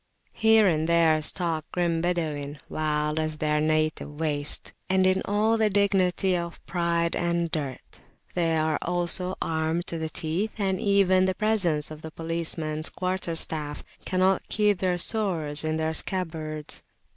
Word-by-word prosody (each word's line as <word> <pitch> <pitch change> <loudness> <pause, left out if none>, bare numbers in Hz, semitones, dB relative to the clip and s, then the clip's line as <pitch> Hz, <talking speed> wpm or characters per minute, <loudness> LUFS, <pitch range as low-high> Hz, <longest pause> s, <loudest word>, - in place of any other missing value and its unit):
Here 220 -1 +5
and 160 -2 +1
there 165 -2 +4
stalk 165 0 0
grim 170 -2 0
Badawin, 155 -5 -2
wild 150 0 -1
as 155 -1 -2
their 150 0 0
native 155 -1 -1
wastes, 150 -2 +1 0.2
and 190 0 +3
in 185 0 +3
all 215 +2 +1
the 215 -1 +3
dignity 190 -2 +2
of 170 -1 -4
pride 170 -1 0
and 170 -1 -1
dirt; 145 -6 -5 0.3
they 165 -2 +1
also 175 +3 0
are 160 -1 -1
armed 170 +2 -1
to 165 - -3
the 160 0 -3
teeth, 175 +7 -2
and 190 -3 0
even 195 -2 +3
the 185 0 0
presence 180 -9 +1
of 155 0 -9
the 160 - -7
policeman's 160 -1 -2
quarterstaff[FN#6] 165 -5 -2 0.2
cannot 185 0 +1
keep 210 -3 +2
their 180 -2 0
swords 170 -8 +3
in 155 0 -1
their 160 0 -1
scabbards. 160 -4 -3
170 Hz, 145 wpm, -26 LUFS, 155-185 Hz, 0.3 s, Here